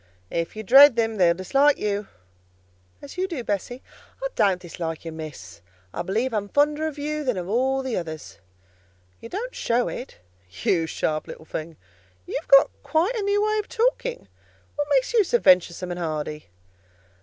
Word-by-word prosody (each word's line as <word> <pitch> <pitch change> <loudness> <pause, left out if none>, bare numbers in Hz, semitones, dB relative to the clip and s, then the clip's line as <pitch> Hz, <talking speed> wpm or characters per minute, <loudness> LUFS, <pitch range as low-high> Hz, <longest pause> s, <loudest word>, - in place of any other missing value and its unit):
"If 170 +3 -2
you 220 - -6
dread 270 +4 +8
them 225 -2 0
they'll 170 -3 +4
dislike 275 +11 +3
you." 205 0 -2 1.0
"As 285 +6 -9
you 375 - +1
do, 320 -10 -5
Bessie?" 230 +5 -3 0.4
"I - - -1
don't 190 -3 +2
dislike 165 -2 -6
you, 165 - -5
Miss; 130 - -9 0.3
I - - -3
believe 220 +8 -1
I - - +1
am 205 -1 -4
fonder 295 +4 +2
of 305 -2 -6
you 300 +1 -3
than 250 -7 -1
of 180 -1 -4
all 265 +5 +1
the 260 -3 -2
others." 160 - -7 0.8
"You 230 - -10
don't 475 +7 -5
show 240 +1 0
it." 250 - -8 0.5
"You - - +3
little 165 -3 +2
sharp 155 -1 -2 0.2
thing! 160 0 -5 0.5
you've 310 - -5
got 275 0 +7
quite 335 +9 +1
a 445 - -1
new 405 +1 +1
way 430 0 +1
of 420 - -4
talking. - - -1 0.5
What 290 0 -1
makes 275 - +2
you 450 -3 +5
so 480 +6 +2
venturesome 180 - +3
and 175 - -4
hardy?" 155 - -4
235 Hz, 180 wpm, -24 LUFS, -, 1.0 s, dread